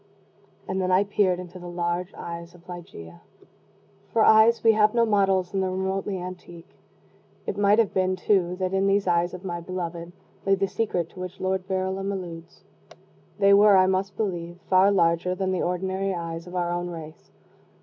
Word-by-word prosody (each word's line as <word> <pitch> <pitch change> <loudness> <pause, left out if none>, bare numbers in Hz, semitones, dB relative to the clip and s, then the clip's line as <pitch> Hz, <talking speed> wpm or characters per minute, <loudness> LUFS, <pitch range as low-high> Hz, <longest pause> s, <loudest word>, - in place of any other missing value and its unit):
And 190 0 -2
then 185 - -1
I 185 +2 +4
peered 200 -3 +1
into 180 0 -9
the 175 - -9
large 175 +1 -2
eyes 170 0 -8
of 175 0 -20
Ligeia. 85 - -10 0.9
For 225 - +3
eyes 220 +2 +5
we 225 - +7
have 215 +1 +3
no 235 -1 +4
models 195 -4 +1
in 195 - 0
the 190 - 0
remotely 190 +1 -2
antique. 180 -2 -10 0.7
It - - -3
might 205 +1 +3
have 230 -3 +2
been, 185 0 +1
too, 180 -2 +1
that 185 0 -3
in 195 0 +2
these 195 0 +2
eyes 175 0 +1
of 180 +1 -11
my 175 -2 -3
beloved 170 -1 -5 0.3
lay 195 0 +3
the 195 0 0
secret 185 -5 -2
to 185 - -13
which 185 +1 -7
Lord 190 0 -2
Verulam 190 +1 -2
alludes. 170 -3 -8 0.7
They 200 -1 +5
were, 200 0 +7
I 185 - +5
must 190 +1 -1
believe, 175 -5 -3
far 190 +1 +5
larger 180 -1 +2
than 190 0 -1
the 185 - -1
ordinary 190 +2 -1
eyes 165 0 -6
of 180 - -9
our 175 -1 -1
own 175 0 -3
race. 160 -2 -10
185 Hz, 185 wpm, -25 LUFS, 175-195 Hz, 0.9 s, we